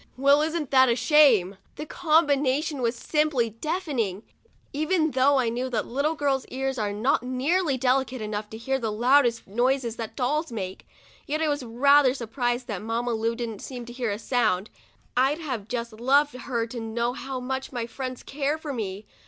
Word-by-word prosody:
Well, 280 Hz, +2 st, +5 dB
isn't 315 Hz, -2 st, -2 dB
that 260 Hz, -1 st, +6 dB
a 235 Hz, -, +3 dB
shame!' 235 Hz, -, +4 dB, 0.2 s
The 300 Hz, -, -6 dB
combination 295 Hz, -3 st, +1 dB
was 235 Hz, 0 st, 0 dB
simply 290 Hz, -4 st, 0 dB
deafening, 235 Hz, -, -2 dB, 0.5 s
even 315 Hz, +2 st, +1 dB
though 275 Hz, +2 st, +3 dB
I 250 Hz, -3 st, +2 dB
knew 250 Hz, +3 st, -2 dB
that 225 Hz, -4 st, -1 dB
little 285 Hz, +6 st, -1 dB
girls' 275 Hz, -3 st, 0 dB
ears 265 Hz, 0 st, -3 dB
are 210 Hz, -1 st, -1 dB
not 235 Hz, +8 st, +1 dB
nearly 270 Hz, +5 st, 0 dB
delicate 260 Hz, 0 st, +1 dB
enough 210 Hz, -1 st, -4 dB
to 220 Hz, -, -8 dB
hear 265 Hz, +4 st, -1 dB
the 225 Hz, -3 st, -2 dB
loudest 240 Hz, +2 st, +3 dB
noises 240 Hz, +2 st, 0 dB
that 225 Hz, -2 st, -6 dB
dolls 295 Hz, +4 st, -1 dB
make; 190 Hz, -4 st, -6 dB, 0.4 s
yet 305 Hz, +2 st, -1 dB
I 315 Hz, -1 st, +1 dB
was 290 Hz, -1 st, -1 dB
rather 260 Hz, +3 st, +4 dB
surprised 245 Hz, 0 st, -2 dB
that 205 Hz, -6 st, -5 dB
Mamma 230 Hz, +3 st, -2 dB
Lu 225 Hz, +1 st, -1 dB
didn't 230 Hz, -4 st, -5 dB
seem 250 Hz, -3 st, -7 dB
to 240 Hz, -, -9 dB
hear 245 Hz, -2 st, -2 dB
a 205 Hz, -, -2 dB
sound. 220 Hz, -5 st, 0 dB, 0.4 s
I'd 265 Hz, +4 st, +3 dB
have 255 Hz, -10 st, -4 dB
just 235 Hz, -1 st, -4 dB
loved 275 Hz, +6 st, +2 dB
her 245 Hz, -2 st, -3 dB
to 235 Hz, +1 st, -7 dB
know 235 Hz, +2 st, -2 dB
how 270 Hz, -1 st, -5 dB
much 265 Hz, +1 st, -4 dB
my 240 Hz, -3 st, -3 dB
friends 255 Hz, +1 st, -6 dB
care 285 Hz, +2 st, -2 dB
for 310 Hz, -3 st, -6 dB
me. 205 Hz, -3 st, -5 dB
255 Hz, 185 wpm, -26 LUFS, 230-285 Hz, 0.5 s, that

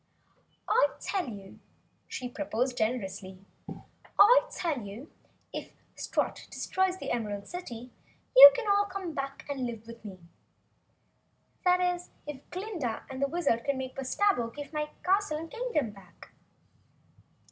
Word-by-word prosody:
"I -, -, +5 dB
tell 375 Hz, -9 st, -2 dB
you," 200 Hz, -3 st, -10 dB, 0.5 s
she 250 Hz, -, -5 dB
proposed 250 Hz, -1 st, -2 dB
generously. 195 Hz, -5 st, -2 dB, 0.8 s
"I -, -, +7 dB
tell 330 Hz, -, -2 dB
you 210 Hz, +8 st, -9 dB, 0.4 s
if -, -, -5 dB, 0.3 s
Strut -, -, -2 dB
destroys 375 Hz, 0 st, 0 dB
the -, -, -5 dB
Emerald 210 Hz, -4 st, -3 dB
City 250 Hz, -9 st, -7 dB, 0.4 s
you -, -, +13 dB, 0.2 s
all 405 Hz, 0 st, +4 dB
can -, -, -11 dB
come 375 Hz, -4 st, -5 dB
back 275 Hz, -1 st, -5 dB
and 270 Hz, -3 st, -2 dB
live 230 Hz, -2 st, -7 dB
with 230 Hz, 0 st, -11 dB
me. 195 Hz, -3 st, -8 dB, 1.5 s
That 360 Hz, 0 st, +5 dB
is 360 Hz, 0 st, 0 dB, 0.2 s
if 285 Hz, -2 st, -8 dB
Glinda 360 Hz, -, -4 dB
and 260 Hz, 0 st, -5 dB
the 280 Hz, -, +3 dB
Wizard 280 Hz, -8 st, 0 dB
can 280 Hz, -1 st, 0 dB
make 260 Hz, -1 st, -5 dB
Bustabo 270 Hz, -, +1 dB
give 290 Hz, +1 st, -8 dB
my 300 Hz, 0 st, -2 dB
castle 385 Hz, -4 st, +2 dB
and 325 Hz, +1 st, -7 dB
Kingdom 465 Hz, -, -1 dB
back?" 190 Hz, -4 st, -16 dB
280 Hz, 135 wpm, -30 LUFS, 230-360 Hz, 1.5 s, you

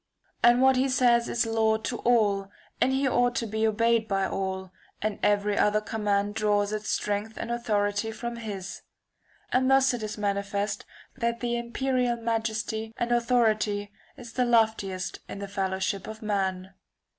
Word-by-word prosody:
And 240 Hz, +2 st, +5 dB
what 265 Hz, -1 st, +5 dB
he 265 Hz, +1 st, +2 dB
says 240 Hz, -2 st, +3 dB
is 235 Hz, 0 st, +1 dB
law 220 Hz, -1 st, +2 dB
to 225 Hz, +2 st, -4 dB
all, 205 Hz, -5 st, +2 dB, 0.3 s
and 265 Hz, -, +4 dB
he 270 Hz, +1 st, +1 dB
ought 245 Hz, -1 st, +2 dB
to 230 Hz, -, -1 dB
be 220 Hz, +1 st, 0 dB
obeyed 230 Hz, +1 st, +2 dB
by 195 Hz, -2 st, +1 dB
all, 190 Hz, -1 st, -3 dB, 0.3 s
and 215 Hz, -1 st, -2 dB
every 205 Hz, 0 st, +2 dB
other 210 Hz, +1 st, +3 dB
command 205 Hz, -1 st, -1 dB
draws 205 Hz, -1 st, +1 dB
its 215 Hz, 0 st, -3 dB
strength 210 Hz, +2 st, -2 dB
and 235 Hz, -, -4 dB
authority 210 Hz, -2 st, 0 dB
from 235 Hz, +2 st, -5 dB
his. 200 Hz, -5 st, -6 dB, 0.7 s
And 260 Hz, +1 st, +3 dB
thus 270 Hz, -1 st, +5 dB
it 240 Hz, -, -3 dB
is 215 Hz, 0 st, -5 dB
manifest 200 Hz, 0 st, -2 dB, 0.3 s
that 235 Hz, -1 st, -1 dB
the 240 Hz, -1 st, -1 dB
imperial 245 Hz, +1 st, 0 dB
] -, -, -12 dB
majesty 225 Hz, -1 st, -2 dB
and 240 Hz, 0 st, -1 dB
authority 220 Hz, -4 st, +1 dB, 0.3 s
is 240 Hz, -3 st, -10 dB
the 250 Hz, -, +1 dB
loftiest 220 Hz, -6 st, +1 dB
in -, -, -6 dB
the 200 Hz, 0 st, -5 dB
fellowship 190 Hz, 0 st, -2 dB
of 220 Hz, 0 st, -8 dB
man. 190 Hz, -2 st, -2 dB
220 Hz, 165 wpm, -27 LUFS, 205-235 Hz, 0.7 s, And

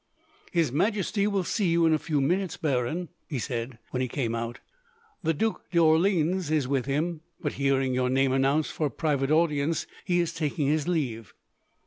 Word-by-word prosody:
"His 165 Hz, -7 st, +2 dB
Majesty 200 Hz, -, +1 dB
will 200 Hz, -2 st, 0 dB
see 205 Hz, +2 st, 0 dB
you 165 Hz, 0 st, +3 dB
in 160 Hz, -, +4 dB
a 155 Hz, -, +2 dB
few 150 Hz, -2 st, 0 dB
minutes, 180 Hz, +6 st, 0 dB
Baron," 155 Hz, +4 st, -1 dB, 0.2 s
he 145 Hz, -, -2 dB
said, 120 Hz, -1 st, -4 dB
when 130 Hz, -, -1 dB
he 130 Hz, -, 0 dB
came 120 Hz, -2 st, -2 dB
out. 115 Hz, +1 st, -3 dB, 0.6 s
"The 165 Hz, -, +1 dB
Duc 220 Hz, +8 st, -2 dB
d'Orleans 170 Hz, +1 st, +3 dB
is 155 Hz, -4 st, +1 dB
with 135 Hz, -1 st, 0 dB
him, 155 Hz, +4 st, -1 dB, 0.2 s
but, 145 Hz, -, -2 dB
hearing 135 Hz, -2 st, +1 dB
your 125 Hz, 0 st, +1 dB
name 135 Hz, +1 st, +2 dB
announced 135 Hz, +3 st, +2 dB
for 155 Hz, -, -1 dB
a -, -, -3 dB
private 140 Hz, -3 st, 0 dB
audience, 155 Hz, -1 st, +2 dB, 0.2 s
he 175 Hz, -1 st, +1 dB
is 170 Hz, -1 st, 0 dB
taking 155 Hz, -2 st, -1 dB
his 150 Hz, +2 st, +1 dB
leave." 125 Hz, -, -2 dB
150 Hz, 180 wpm, -27 LUFS, 135-170 Hz, 0.6 s, in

